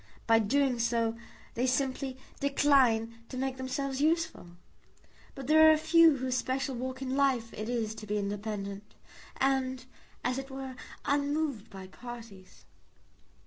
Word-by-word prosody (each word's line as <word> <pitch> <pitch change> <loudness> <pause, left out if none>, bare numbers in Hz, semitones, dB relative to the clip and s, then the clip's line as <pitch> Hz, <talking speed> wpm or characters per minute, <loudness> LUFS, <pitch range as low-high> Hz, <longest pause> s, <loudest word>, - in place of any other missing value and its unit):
By 225 -1 +5
doing 255 +3 +1
so 230 -1 +1 0.4
they 245 +2 0
simply 260 0 -1 0.2
decline 255 -5 +3
to 255 - -6
make 265 0 -2
themselves 265 +1 -3
useful. 320 - 0 0.9
But 270 - -7
there 315 +3 +7
are - - +8
a - - +3
few 320 -1 +5
whose 255 -1 -1
special 265 +1 -1
walk 260 +2 -4
in 260 0 -2
life 260 -5 +1
it 215 +2 -5
is 225 -3 -1
to 215 - -9
be 210 +1 -1
independent, 205 0 -4 0.4
and, 260 -1 0 0.4
as 250 +1 0
it 270 0 -7
were, 265 -1 -6 0.3
unmoved 285 -4 0
by 190 -1 -9
parties." 225 -2 -11
260 Hz, 145 wpm, -30 LUFS, 230-275 Hz, 0.9 s, are